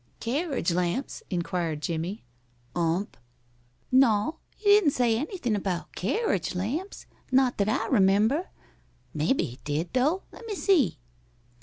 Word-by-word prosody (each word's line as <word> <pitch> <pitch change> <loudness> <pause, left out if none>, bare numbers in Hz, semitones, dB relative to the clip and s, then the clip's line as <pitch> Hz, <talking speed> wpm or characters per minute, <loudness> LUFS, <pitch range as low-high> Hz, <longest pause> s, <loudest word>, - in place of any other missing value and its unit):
"Carriage 270 - -1
lamps?" 180 +9 -1
inquired 170 -4 -2
Jimmie. 170 +5 -3 0.5
"Ump." 175 +3 0 0.8
"No, 260 +3 +3 0.2
he 410 -1 +2
didn't 410 -6 +6
say 240 -3 +2
anything 265 - -2
about 190 -3 -3
carriage 210 - -1
lamps 275 - -3 0.3
not 255 -2 +3
that 200 +1 +2
I 220 - 0
remember. 220 - +3 0.7
Maybe 160 - +1
he 125 +2 -6
did, 150 +4 -2
though. 295 +9 +2
Lemme 455 -3 -7
see.... 325 - +3
220 Hz, 120 wpm, -27 LUFS, 180-290 Hz, 0.8 s, didn't